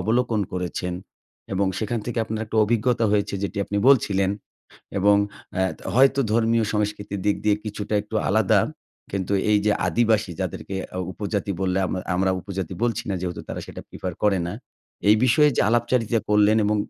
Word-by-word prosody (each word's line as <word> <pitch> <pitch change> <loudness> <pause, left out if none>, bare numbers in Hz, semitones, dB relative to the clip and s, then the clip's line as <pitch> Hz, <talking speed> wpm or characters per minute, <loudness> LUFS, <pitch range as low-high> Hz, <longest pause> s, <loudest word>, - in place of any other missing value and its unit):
অবলোকন 115 -1 +1
করেছেন। 90 0 -3 0.6
এবং 95 +1 +1
সেখান 115 +2 -2
থেকে 120 -1 -3
আপনার 110 0 -3
একটা 110 0 -5
অভিজ্ঞতা 115 +1 +1
হয়েছে 100 -1 +1
যেটি 100 +1 -3
আপনি 100 - -4
বলছিলেন। 100 -8 +3 0.7
এবং 100 +1 +5 0.4
অ্যা 95 - +1
ত - - -30 0.2
হয়তো 135 +2 +5
ধর্মীয় 115 0 +2
সংস্কৃতির 105 -2 -2
দিক 105 - +3
দিয়ে 105 -1 +3
কিছুটা 105 0 -4
একটু 105 - -11
আলাদা। - - +4 0.5
কিন্তু 95 0 -2 0.2
এই 105 - +5
যে 105 - +4 0.2
আদিবাসী 110 -4 +2
যাদেরকে 95 - -4 0.2
আউ 95 - -2
উপজাতি 100 0 -2
বললে, 95 0 +1
আম - - -4 0.2
আমরা 95 +1 +2
উপজাতি 95 -2 -5
বলছি 120 -3 0
না 95 - 0
যেহেতু 90 -1 -4
তারা - - -4
সেটা - - -8
প্রিফার - - -5
করে 100 -2 +3
না। 90 - -4 0.6
এই 105 - +7
বিষয়ে 150 +4 +5
যে - - +3
আলাপচারিতা 120 -1 +1
করলেন 105 +1 +5
এবং 105 +1 +2
105 Hz, 170 wpm, -24 LUFS, 100-115 Hz, 0.7 s, এই